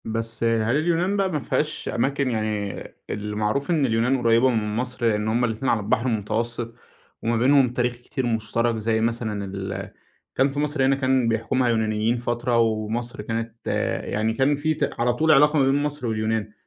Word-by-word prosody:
بس 115 +1 -2
هل 115 +1 +2
اليونان 175 +5 +1
بقى 195 -1 +1
ما 150 - -1
فيهاش 150 +2 -2
أماكن 135 +2 0
يعني 110 -2 -2 0.3
المعروف 105 - -2
إن 155 -5 +2
اليونان 120 +2 +1
قريّبة 115 +2 +4
من 105 -3 -1
مصر، 125 0 -2
لإن 105 -1 +1
هُم 120 +3 +2
الاتنين 115 +3 -2
على 115 - +2
البحر 110 +4 0
المتوسط 115 +1 -2 0.5
وما 115 0 +1
بينهم 130 +2 +4
تاريخ 125 0 0
كتير 125 +2 -5
مشترك، 115 0 0
زي 110 0 0
مثلًا 110 -3 -1
اللي 95 +1 -6 0.4
كان 135 +2 +3
في 140 +1 -4
مصر 145 -2 +1
هنا 135 +1 +3
كان 130 -2 +1
بيحكمها 115 +3 +1
يونانيين 110 +1 +1
فترة، 120 0 -1
ومصر 115 +1 -1
كانت 115 +1 -5 0.4
يعني 110 +1 -1
كان 135 +5 +2
في 155 +2 0
ت - - -1
على 120 +1 +2
طول 155 +5 +2
علاقة 150 +1 +5
ما 135 - +4
بين 135 +1 +3
مصر 145 -4 -3
واليونان، 110 -1 -1
115 Hz, 175 wpm, -24 LUFS, 110-130 Hz, 0.5 s, علاقة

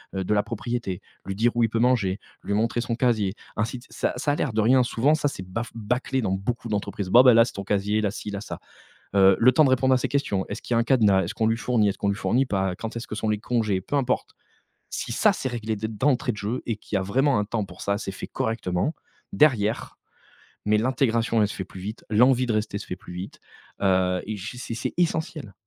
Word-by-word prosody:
heu, 95 - -1
de 100 - 0
la 105 - +3
propriété, 115 -2 -4 0.3
lui 95 - -4
dire 115 +4 +2
où 120 - +2
il 115 - +3
peut 115 - -1
manger, 115 -6 +2 0.2
lui 100 - -2
montrer 115 +2 +1
son 115 0 -2
casier, 110 -5 +1 0.2
ainsi 115 +4 -1
de 120 - -13
ç - - -19
ça - - -1
ça 135 +4 0
a - - +1
l'air 140 - -1
de 110 0 +1
rien, 125 +4 +5
souvent 125 +4 +2
ça 155 -2 +1
s'est 115 -9 -5
baf 110 +6 -5
bâclé 125 +4 -1
dans 95 - 0
beaucoup 115 +5 -3
d'entreprises. 100 -2 -3
Bon 120 - +8
bah 125 -2 +7
là 115 0 +7
c'est - - -7
ton 100 - -5
casier, 105 +2 0
là 105 - +1
ci, 105 +1 -6
là 100 0 -4
ça. - - -7 0.6
Heu, 95 -1 +6
le 125 +2 +6
temps 150 +4 +5
de - - +3
répondre 130 0 +3
à - - +5
ces 125 - -1
questions. 100 -9 -1
Est-ce - - -6
qu'il - - -3
y - - +3
a - - +3
un 115 - +3
cadenas? 110 -6 +4
Est-ce 85 - -4
qu'on 110 - +1
lui 115 0 +1
fournit? 115 -2 +2
Est-ce 100 - -3
qu'on 100 - 0
lui 100 - 0
fournit 125 +5 +1
pas? 95 -5 -1
Quand 115 +4 -6
est-ce 115 - -5
que - - -5
sont 110 - -2
les 105 -1 0
congés? 110 -4 0
Peu 120 - -4
importe. 130 -2 0 0.6
Si - - -4
ça - - +4
s'est 130 - -3
réglé 110 -3 -3
d 110 +2 -3
d'entrée 125 +4 +1
de - - -9
jeu 105 +5 -3
et 115 - -1
qu'il 105 - -4
y - - +3
a - - -1
vraiment 130 +6 +2
un 105 - +1
temps 110 -1 -2
pour - - -13
ça, 100 0 0
c'est 100 -2 -5
fait - - -7
correctement, 110 - -1 0.4
derrière, 115 -8 +2 0.7
mais 105 +1 +3
l'intégration 115 -1 +1
elle 105 - +3
se - - -6
fait 95 - -4
plus 95 0 -11
vite, 105 +4 -7
l'envie 125 +3 +4
de 120 - -1
rester 105 -1 -1
se 105 - -7
fait - - -5
plus - - -13
vite, 90 +2 -7 0.4
heu, 95 -2 +2
et 110 0 -4
j 110 +6 -7
c'est 125 - -5
c'est 115 - -3
essentiel. 160 - -1
110 Hz, 265 wpm, -25 LUFS, 100-125 Hz, 0.7 s, Bon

